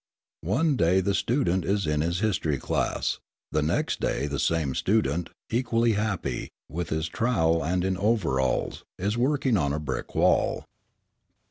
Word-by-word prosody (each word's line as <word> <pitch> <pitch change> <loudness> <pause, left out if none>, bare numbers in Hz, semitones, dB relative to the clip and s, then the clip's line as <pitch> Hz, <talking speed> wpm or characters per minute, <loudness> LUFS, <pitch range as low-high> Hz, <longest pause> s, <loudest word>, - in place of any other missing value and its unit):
One 145 +6 +2
day 90 +1 +4
the 100 +1 0
student 95 -7 +1
is 100 +1 0
in 75 -1 +1
his 85 +4 -1
history 85 -9 +1
class. - - -1 0.3
The 75 - +1
next 75 +3 0
day 70 - 0
the 70 -1 -3
same 80 -5 +1
student, 90 -4 +1 0.2
equally 115 -1 +2
happy, 105 -3 -2 0.2
with 85 +4 -4
his 80 +1 -1
trowel 85 - +1
and 90 +4 0
in 95 -1 0
overalls, 85 - 0
is 100 +4 -1
working 130 -1 +2
on 70 -5 0
a 75 - -1
brick 70 -4 -5
wall. - - +2
90 Hz, 150 wpm, -26 LUFS, 80-110 Hz, 0.3 s, day